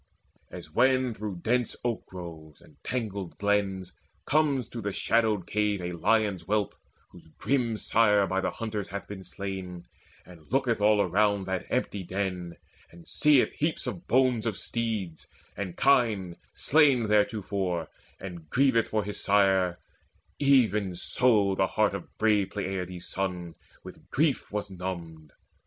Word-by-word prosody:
As 75 - -10
when 130 +4 +3
through 105 -4 -6
dense 125 0 +1
oak 120 -2 -2
groves 80 -4 -10
and - - -20
tangled 100 -7 -4
glens 100 -3 0 0.3
Comes 140 -4 +2
to 120 - -6
the 100 -1 -2
shadowed 110 -2 +1
cave 105 -1 0
a 90 0 -4
lion's 100 +2 +1
whelp 105 +4 -1 0.4
Whose 85 -2 -16
grim 120 -5 0
sire 105 -2 +3
by 95 +1 -1
the - - 0
hunters 110 -3 -4
hath 100 0 -6
been 100 -2 -8
slain, 95 -3 -6 0.4
And 85 -4 -16
looketh 125 -4 +1
all 105 0 +5
around 100 +1 +2
that 95 -1 -3
empty 100 - -1
den, 90 -2 -4 0.3
And 85 0 -16
seeth 150 -4 +3
heaps 155 +2 -2
of 175 - -6
bones 125 -3 +2
of 105 -4 -2
steeds 110 -8 -3 0.3
and 95 -3 -5
kine 110 -10 +2 0.2
Slain 140 -6 +4
theretofore, 100 -5 0 0.3
and 85 -5 -9
grieveth 130 - +3
for 110 -1 0
his 105 0 -5
sire; 95 -3 +3 0.6
Even 110 -9 +3
so 105 0 +2
the 95 0 +1
heart 105 +2 +1
of 100 -3 -8
brave 105 -3 +2
Peleides' 90 -3 -4
son 90 -3 -3 0.3
With - - -13
grief 145 -1 0
was 105 -1 -3
numbed. 85 -4 -6
100 Hz, 145 wpm, -28 LUFS, 90-115 Hz, 0.6 s, all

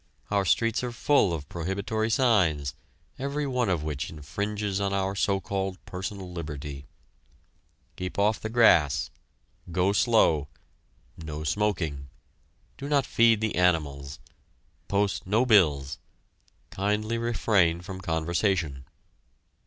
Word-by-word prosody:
Our 100 -1 +2
streets 115 +8 +1
are 125 - -2
full 120 -4 +2
of 75 -4 -4
prohibitory 100 +6 -2
signs, 90 - +2 0.5
every 140 +2 -2
one 125 -5 0
of 85 -5 0
which 75 -3 -3
infringes 100 +7 -3
on 100 0 0
our 95 0 0
so 100 0 +1
called 95 -1 -3
personal 95 0 -6
liberty: 75 -4 -6 1.1
"Keep 90 0 -5
off 105 +2 +2
the 110 - -4
grass," 100 - +4 0.6
"Go 90 +3 +2
slow," 100 - +3 0.7
"No 80 -2 -6
smoking," 80 -6 -1 0.7
"Do 140 +1 -5
not 140 -3 +2
feed 115 -2 +4
the 110 -1 0
animals," 75 -6 0 0.7
"Post 100 -2 0
no 110 +6 +3
bills," 75 - +3 0.7
"Kindly 105 +4 -1
refrain 100 -7 +2
from 95 0 -8
conversation." 80 -4 -1
95 Hz, 115 wpm, -27 LUFS, 80-110 Hz, 1.1 s, grass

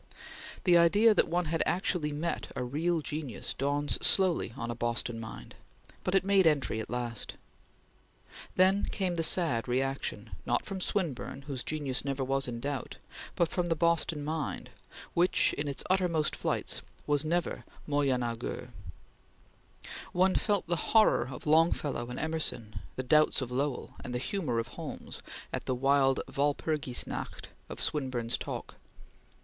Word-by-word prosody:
The 175 -2 +6
idea 205 +7 +6
that - - +3
one 175 +1 0
has 165 +1 0
actually 175 -4 0
met 155 +4 -2
a - - -2
real 160 +6 0
genius 150 -7 -4
dawns 145 +1 -1
slowly 185 - +4
on 115 0 -3
a - - -4
Boston 120 0 -1
mind, 110 -1 -8 0.5
but 185 - 0
it 190 - +3
made 195 -3 +5
entry 140 -7 +2
at 110 - -5
last. 120 -1 -3 1.2
Then 190 +2 +4
came 185 -3 -1
the 170 - 0
sad 160 -9 +2
reaction, 135 +2 -1
not - - 0
from 190 -1 -5
Swinburne 155 -8 -2
whose 135 -3 -4
genius 145 -5 -1
never 135 -1 -1
was 135 +1 0
in 120 -1 -4
doubt, 140 +1 -4 0.4
but 170 -2 +2
from 180 -1 -1
the 165 - +1
Boston 165 -2 +1
mind 155 -1 -3 0.4
which, 175 +2 +3
in 145 - -2
its 140 - -3
uttermost 180 -5 +2
flights, - - -1 0.2
was 145 -1 +2
never 170 +2 -1 0.2
moyenageux. 125 -5 -1 1.4
One 185 +1 +4
felt 205 -2 +1
the 175 0 0
horror 215 - +4
of 125 - -8
Longfellow 150 -5 +2
and 125 - -5
Emerson, 150 -10 -1 0.2
the 130 - -2
doubts 155 +4 +4
of 130 -2 -4
Lowell 135 +1 -2
and 125 - -4
the - - +2
humor 150 - -2
of 115 - -1
Holmes, - - -7 0.3
at - - -3
the 130 - +1
wild 135 +1 +3
Walpurgis 145 -2 -1
night - - -6 0.2
of - - -7
Swinburne's 125 -5 0
talk. - - -6
145 Hz, 150 wpm, -30 LUFS, 130-170 Hz, 1.4 s, The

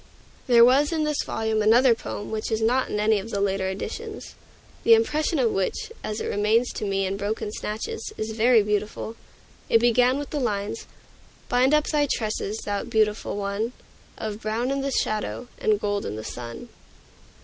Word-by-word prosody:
There 235 -2 +7
was 275 +5 +4
in 320 -2 0
this 300 -1 0
volume 220 -1 -1
another 235 +4 +5
poem 205 -2 -6
which 220 +1 -3
is 220 - +1
not 245 +4 +1
in 210 - -2
any 215 0 +3
of 205 +4 -7
the 200 - -2
later 195 -1 0
editions, 190 +1 -6 0.5
the 460 - +8
impression 325 -7 +1
of 240 -5 +2
which, 195 - -2
as 215 0 -3
it - - -3
remains 220 +4 +1
to - - -4
me 195 -1 0
in 195 +1 -2
broken 210 +1 -3
snatches, 215 +1 -5
is 220 0 -3
very 225 0 +4
beautiful. 210 +2 -2 0.5
It - - +6
began 245 +2 +3
with 290 0 -5
the 300 - -1
lines 210 -3 -2 0.6
"Bind 255 +4 +4
up 300 - +2
thy 295 -2 +1
tresses, 215 -1 -2
thou 205 -1 -2
beautiful 215 -1 0
one, 205 +4 -2 0.4
Of 215 0 -5
brown 225 +4 -1
in 275 0 -1
the 275 - -1
shadow, 230 0 -2
and 210 -1 +2
gold 205 -1 -1
in 105 - -4
the 110 - -6
sun." 115 0 -7
220 Hz, 180 wpm, -25 LUFS, 205-250 Hz, 0.6 s, the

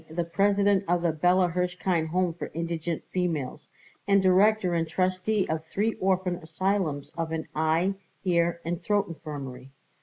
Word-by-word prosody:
the 170 +2 -1
President 200 +3 +2
of 175 0 +1
the 170 - +3
Bella 180 +4 +3
Hirshkind 180 -1 0
Home 180 +1 0
for 170 - -6
Indigent 165 0 -3
Females, 160 -7 -2 0.4
and 200 0 +5
director 190 0 +4
and 165 -1 0
trustee 185 +4 0
of 160 0 -2
three 215 +6 0
orphan 185 -1 +1
asylums 165 -3 -2
and - - -10
of - - -11
an 160 -1 -3
eye, 160 +5 +2 0.3
ear, 170 -2 +1
and 170 0 -2
throat 205 -1 +1
infirmary. 135 -5 -7
175 Hz, 155 wpm, -27 LUFS, 160-190 Hz, 0.4 s, and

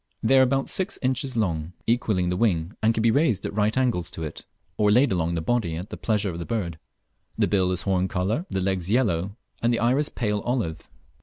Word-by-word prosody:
They 130 +4 +5
are - - +7
about 135 +1 +2
six 190 +3 -1
inches 130 0 -1
long, 85 -5 -1
equalling 105 -6 +1
the 90 - 0
wing, 90 -4 +1
and 110 +1 +4
can 110 -1 -1
be 115 - +4
raised 135 - +2
at - - -3
right 105 +3 +1
angles 120 -10 +1
to 80 - -6
it, 75 - -7 0.3
or 105 -1 +2
laid 125 +5 +4
along 85 -2 0
the 80 - -1
body 90 -3 0
at 90 +6 -7
the - - -4
pleasure 105 -3 0
of 85 - -6
the - - -3
bird. 90 -9 -3 0.6
The - - +3
bill 95 -3 +2
is 90 0 -2
horn 95 -1 +1
colour, 100 - -1
the 95 - -1
legs 95 -1 -1
yellow, 100 -4 +1 0.2
and 120 - +2
the 120 - +1
iris 130 +6 +2
pale 105 -3 -1
olive. 115 -10 -2
105 Hz, 225 wpm, -25 LUFS, 90-120 Hz, 0.6 s, are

